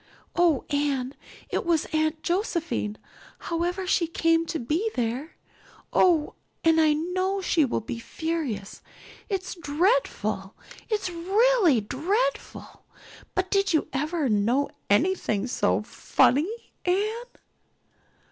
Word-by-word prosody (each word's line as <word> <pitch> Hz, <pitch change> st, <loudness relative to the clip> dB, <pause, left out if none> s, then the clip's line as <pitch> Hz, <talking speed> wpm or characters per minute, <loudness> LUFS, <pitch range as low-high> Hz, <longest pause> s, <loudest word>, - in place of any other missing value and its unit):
"Oh, 340 Hz, -7 st, +3 dB
Anne, 280 Hz, -3 st, 0 dB, 0.4 s
it -, -, 0 dB
was 335 Hz, -3 st, +1 dB
Aunt 310 Hz, 0 st, 0 dB
Josephine, 340 Hz, -, -1 dB, 0.4 s
however 350 Hz, +3 st, -2 dB
she 350 Hz, -2 st, +2 dB
came 330 Hz, 0 st, +2 dB
to 325 Hz, -, -2 dB
be 320 Hz, -, -1 dB
there. 250 Hz, +6 st, -2 dB, 0.6 s
Oh, 330 Hz, -5 st, +3 dB, 0.3 s
and 325 Hz, 0 st, +5 dB
I 310 Hz, -1 st, +5 dB
know 370 Hz, +5 st, -1 dB
she 340 Hz, -5 st, +2 dB
will 250 Hz, -, -1 dB
be 230 Hz, +2 st, -5 dB
furious. 275 Hz, -8 st, -4 dB, 0.5 s
It's 380 Hz, -2 st, -2 dB
dreadful 360 Hz, +9 st, 0 dB, 0.3 s
it's 420 Hz, -4 st, -1 dB
really 380 Hz, -, +3 dB
dreadful 395 Hz, -, -2 dB, 0.5 s
but 370 Hz, 0 st, -1 dB
did 395 Hz, -2 st, +2 dB
you 315 Hz, -, +1 dB
ever 300 Hz, +2 st, 0 dB
know 235 Hz, +6 st, +1 dB, 0.2 s
anything 220 Hz, -, +2 dB
so 100 Hz, -, +1 dB
funny, 290 Hz, -, +2 dB, 0.3 s
Anne?" 370 Hz, +3 st, +2 dB
330 Hz, 110 wpm, -26 LUFS, 275-370 Hz, 0.6 s, and